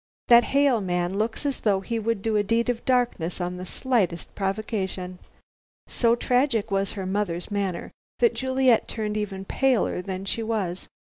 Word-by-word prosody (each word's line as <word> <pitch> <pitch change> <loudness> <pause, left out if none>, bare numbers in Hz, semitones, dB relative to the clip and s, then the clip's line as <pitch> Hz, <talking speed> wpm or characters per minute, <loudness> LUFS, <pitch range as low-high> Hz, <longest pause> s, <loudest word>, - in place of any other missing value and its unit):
That 240 0 +8
Hale 275 -5 +3
man 180 -1 -1
looked 225 +6 -2
as 280 -2 -1
though 200 -3 +1
he 230 +4 -2
would 220 -2 -1
do 225 -1 0
a 210 - +4
deed 230 +4 +1
of 240 -1 -1
darkness 245 -11 0
on 180 0 -3
the 185 +1 -7
slightest 205 -11 -1
provocation." 195 -2 -3 0.7
So 235 -1 +2
tragic 245 -3 +1
was 195 0 0
her 195 -3 -5
mother's 190 -2 -2
manner, 195 -4 -2 0.3
that 470 - +3
Juliet 260 -3 +2
turned 210 -2 -3
even 195 -2 -3
paler 255 -6 +1
than 190 0 -5
she 225 - -1
was. 205 -6 -2
210 Hz, 165 wpm, -25 LUFS, 190-235 Hz, 0.7 s, That